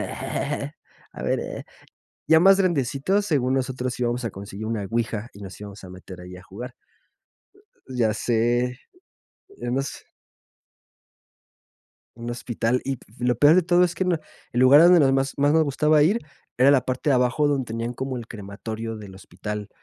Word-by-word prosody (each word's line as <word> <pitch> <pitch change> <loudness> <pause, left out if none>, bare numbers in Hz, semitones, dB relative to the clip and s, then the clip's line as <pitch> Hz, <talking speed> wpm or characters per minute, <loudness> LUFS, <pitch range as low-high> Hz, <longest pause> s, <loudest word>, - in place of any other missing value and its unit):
a 145 +1 -6
ver, - - 0
eh, - - -6 0.6
ya 160 0 +6
más 195 +2 +6
grandecitos, 175 - +1
según 135 -8 +1
nosotros, 130 -1 -2
íbamos 120 0 -1
a 115 - -1
conseguir 100 +2 -8
una 110 -3 -2
ouija 115 -1 -2
y 100 - -13
nos 95 0 -9
íbamos 100 -1 -10
a 90 - -10
meter 90 0 -11
ahí, 90 +1 -10
a 90 - -13
jugar. 120 +6 -9 1.2
Ya 120 -4 +1
sé, 120 +3 0 0.8
en 120 +1 -2
u 135 - +1
hos 135 - -3 2.2
Un 120 0 -6
hospital, 120 0 -1
y 135 -1 -2
p - - -21
lo 125 0 +1
peor 145 +7 +6
de 185 - +5
todo 175 +1 +3
es 175 - -4
que - - 0
no 180 -3 +1 0.3
el 120 - -1
lugar 135 +4 +8
a - - +7
donde 175 0 +7
nos 135 -3 +4
más 135 0 0
más 145 +1 +3
nos 160 0 +5
gustaba 150 +1 +3
ir 200 +9 +3 0.4
era 130 +3 +6
la 140 -3 +4
parte 130 +3 -2
de - - +4
abajo, 125 +4 +2
donde 140 -2 +1
tenían 115 +2 -4
como 130 +1 -4
el 115 -2 -8
crematorio 110 +2 -6
del 100 -3 -10
hospital, 105 +3 -7
125 Hz, 180 wpm, -24 LUFS, 110-145 Hz, 2.2 s, lugar